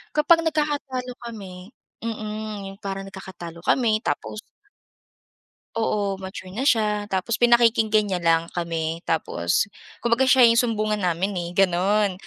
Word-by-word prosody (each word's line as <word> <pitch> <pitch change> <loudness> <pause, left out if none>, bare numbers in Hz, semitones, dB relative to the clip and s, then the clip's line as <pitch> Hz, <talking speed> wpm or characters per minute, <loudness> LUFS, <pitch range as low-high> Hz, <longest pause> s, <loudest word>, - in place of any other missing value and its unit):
kapag 330 +2 +4
nagkakatalo 290 -5 -2 0.2
kami, 195 0 -10 0.2
mm. 215 -2 -5
Yung 195 - -14
parang 195 -2 -5
nagkakatalo 185 -3 -9
kami 220 -4 +3
tapos 110 - -3 1.4
Oo, 200 -3 -1
mature 190 -1 -8
na 240 - -3
siya. 210 -2 +1
Tapos 190 +4 -1
pinakikinggan 225 -3 +4
niya 185 -3 -2
lang 165 0 +3
kami, 165 -1 -2
tapos 150 - +1 0.4
kumbaga 235 +2 +3
siya 255 -2 +7
yung 230 - +6
sumbungan 215 -3 -1
namin, 180 +3 0
eh, 175 -2 -3
gano'n. 195 +2 +2
205 Hz, 125 wpm, -24 LUFS, 180-230 Hz, 1.4 s, siya